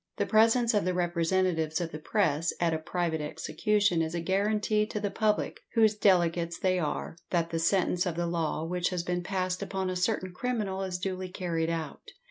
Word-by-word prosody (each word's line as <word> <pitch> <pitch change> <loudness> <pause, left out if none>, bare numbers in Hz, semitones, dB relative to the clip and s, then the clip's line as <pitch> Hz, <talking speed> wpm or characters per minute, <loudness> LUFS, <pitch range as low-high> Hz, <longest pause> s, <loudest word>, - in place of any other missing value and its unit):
The - - +1
presence 230 +2 +4
of 205 - +2
the 180 0 0
representatives 170 -2 +1
of 170 -2 -3
the 155 - -6
press 165 -3 +1
at 170 -1 +2
a 160 - -1
private 165 -1 -2
execution 175 +4 0
is 160 +1 -2
a - - -1
guarantee 210 +4 +1
to 210 - -3
the 205 -1 -2
public, 210 +1 0 0.2
whose 220 -2 +5
delegates 175 -4 +2
they 185 -1 +1
are, 155 0 -3
that 170 -2 0
the 165 - -1
sentence 180 +1 +2
of 170 - -2
the 175 0 -1
law 165 -2 -1
which 180 +1 -1
has 180 -2 -2
been 180 0 -1
passed 185 0 -2
upon 190 -1 -2
a - - -3
certain 185 0 -1
criminal 210 -3 -2
is 185 -2 -2
duly 185 0 -4
carried 170 -3 -2
out. 160 -3 -4
180 Hz, 195 wpm, -29 LUFS, 165-200 Hz, 0.2 s, whose